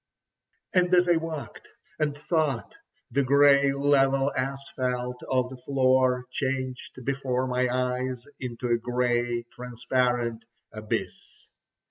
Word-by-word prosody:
And 180 Hz, -1 st, +3 dB
as 180 Hz, 0 st, +4 dB
I 175 Hz, -1 st, +4 dB
walked, 160 Hz, -2 st, -6 dB, 0.3 s
and 145 Hz, -2 st, 0 dB
thought, 150 Hz, -5 st, -1 dB, 0.4 s
the 140 Hz, -, +2 dB
grey 140 Hz, +1 st, +5 dB
level 135 Hz, 0 st, +2 dB
asphalt 130 Hz, -2 st, -3 dB
of 130 Hz, -1 st, +1 dB
the 130 Hz, -, -8 dB
floor 130 Hz, -1 st, +2 dB
changed 130 Hz, -2 st, -4 dB
before 130 Hz, -2 st, -1 dB
my 125 Hz, 0 st, 0 dB
eyes 125 Hz, 0 st, -2 dB
into 125 Hz, -1 st, -4 dB
a 120 Hz, 0 st, +2 dB
grey, 120 Hz, 0 st, 0 dB
transparent 125 Hz, -1 st, -1 dB, 0.3 s
abyss. 110 Hz, 0 st, -5 dB
130 Hz, 110 wpm, -27 LUFS, 125-140 Hz, 0.4 s, grey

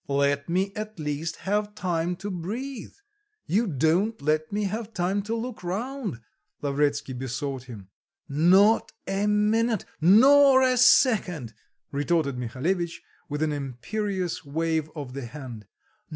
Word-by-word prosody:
"Let 140 Hz, +1 st, +1 dB
me 190 Hz, +3 st, 0 dB
at 215 Hz, -1 st, -6 dB
least 150 Hz, +1 st, -3 dB
have 205 Hz, +1 st, -1 dB
time 175 Hz, -3 st, -1 dB
to 200 Hz, +3 st, -6 dB
breathe; 220 Hz, +9 st, -5 dB, 0.5 s
you 220 Hz, +5 st, +1 dB
don't 170 Hz, -, +1 dB
let 155 Hz, +2 st, 0 dB
me 210 Hz, +1 st, -1 dB
have 215 Hz, +2 st, -4 dB
time 190 Hz, +2 st, 0 dB
to 220 Hz, +3 st, -3 dB
look 230 Hz, -3 st, -5 dB
round," 205 Hz, -, -4 dB, 0.4 s
Lavretsky 145 Hz, -1 st, 0 dB
besought 130 Hz, +1 st, -4 dB
him. 110 Hz, -7 st, -10 dB, 0.4 s
"Not 185 Hz, +9 st, +4 dB
a 195 Hz, +2 st, -1 dB
minute, 215 Hz, +1 st, +2 dB, 0.2 s
nor 265 Hz, -, +7 dB
a 255 Hz, -1 st, +3 dB
second!" 190 Hz, -, +4 dB, 0.4 s
retorted 145 Hz, -1 st, 0 dB
Mihalevitch 155 Hz, +9 st, -2 dB, 0.3 s
with 145 Hz, +1 st, -1 dB
an 155 Hz, -, 0 dB
imperious 175 Hz, -, -3 dB
wave 160 Hz, +1 st, -1 dB
of 140 Hz, -5 st, -6 dB
the 135 Hz, -3 st, -5 dB
hand. 120 Hz, -6 st, -9 dB
175 Hz, 130 wpm, -26 LUFS, 145-210 Hz, 0.5 s, nor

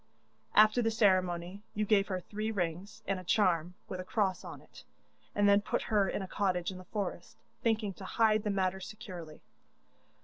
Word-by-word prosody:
'After 215 Hz, +3 st, +6 dB
the 225 Hz, -, +2 dB
ceremony 185 Hz, -3 st, +1 dB
you 210 Hz, 0 st, 0 dB
gave 205 Hz, -1 st, +3 dB
her 185 Hz, -3 st, -2 dB
three 215 Hz, +4 st, -4 dB
rings 195 Hz, +2 st, -3 dB
and 195 Hz, -1 st, -1 dB
a -, -, -9 dB
charm 180 Hz, -3 st, +2 dB
with 185 Hz, -, -5 dB
a -, -, -3 dB
cross 190 Hz, -1 st, 0 dB
on -, -, -8 dB
it, -, -, -16 dB, 0.5 s
and 205 Hz, 0 st, +4 dB
then 200 Hz, 0 st, +6 dB
put -, -, -1 dB
her 200 Hz, -2 st, +4 dB
in 200 Hz, -, -2 dB
a -, -, -6 dB
cottage 185 Hz, -2 st, 0 dB
in 185 Hz, -, -8 dB
the 185 Hz, -, -12 dB
forest, 195 Hz, -3 st, -5 dB, 0.2 s
thinking 220 Hz, -3 st, +1 dB
to 190 Hz, -, -10 dB
hide 215 Hz, +1 st, +3 dB
the 210 Hz, -, -2 dB
matter 190 Hz, -1 st, 0 dB
securely. 180 Hz, -6 st, -9 dB
195 Hz, 190 wpm, -32 LUFS, 185-210 Hz, 0.5 s, After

